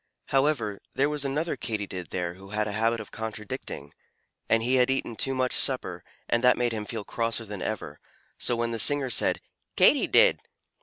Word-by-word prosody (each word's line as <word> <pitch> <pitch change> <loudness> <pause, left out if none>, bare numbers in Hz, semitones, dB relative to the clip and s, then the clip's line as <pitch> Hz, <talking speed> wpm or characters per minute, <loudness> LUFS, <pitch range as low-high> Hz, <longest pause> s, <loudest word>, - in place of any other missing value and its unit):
However, 135 -7 +1 0.2
there 140 +2 +2
was 150 -1 -1
another 150 +5 -1
Katydid 100 -6 -5
there 90 -1 -3
who 95 +2 -13
had 105 +1 -1
a - - -3
habit 115 +2 +1
of 110 - -9
contradicting, 110 -2 -6 0.6
and 115 0 +3
he 130 +2 +2
had 125 0 +3
eaten 135 -3 -1
too 135 +4 0
much 130 -1 0
supper, - - +3 0.2
and 120 +1 +1
that 125 0 +5
made 120 -1 0
him 110 -2 -4
feel 110 -1 -5
crosser 115 +1 -2
than 105 -3 -7
ever; 75 -9 -4 0.4
so 120 - +1
when 115 0 -1
the 115 - -3
singer 135 +4 +3
said - - +2 0.3
"Katy - - +5
did!" - - +5
115 Hz, 190 wpm, -27 LUFS, 105-130 Hz, 0.6 s, that